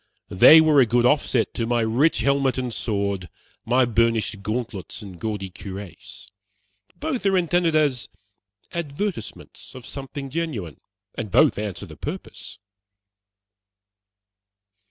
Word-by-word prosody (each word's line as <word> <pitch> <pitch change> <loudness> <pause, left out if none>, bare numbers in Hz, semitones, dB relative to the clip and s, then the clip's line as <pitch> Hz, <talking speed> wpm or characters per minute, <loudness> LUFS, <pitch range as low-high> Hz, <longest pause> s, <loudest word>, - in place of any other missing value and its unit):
They 155 +12 +8
were 155 -3 +5
a 125 - +4
good 120 +2 +2
offset 125 -3 +2
to 115 - -2
my 120 0 +1
rich 120 +6 +2
helmet 140 +1 +1
and 125 -2 -3
sword, 100 -6 -2 0.4
my 125 +2 +3
burnished 115 -2 +1
gauntlets 110 0 -5
and 95 -4 -11
gaudy 105 -4 -4
cuirass. 100 +2 -9 0.7
Both 305 -6 -3
are 195 -1 +3
intended 175 -2 +1
as 145 -5 +1 0.6
advertisements 170 - -5
of 125 -2 -10
something 135 0 -7
genuine, 130 - -4 0.3
and - - -5
both - - +4
answer 105 -3 -5
the - - -13
purpose." - - -7
120 Hz, 120 wpm, -23 LUFS, 105-145 Hz, 0.7 s, They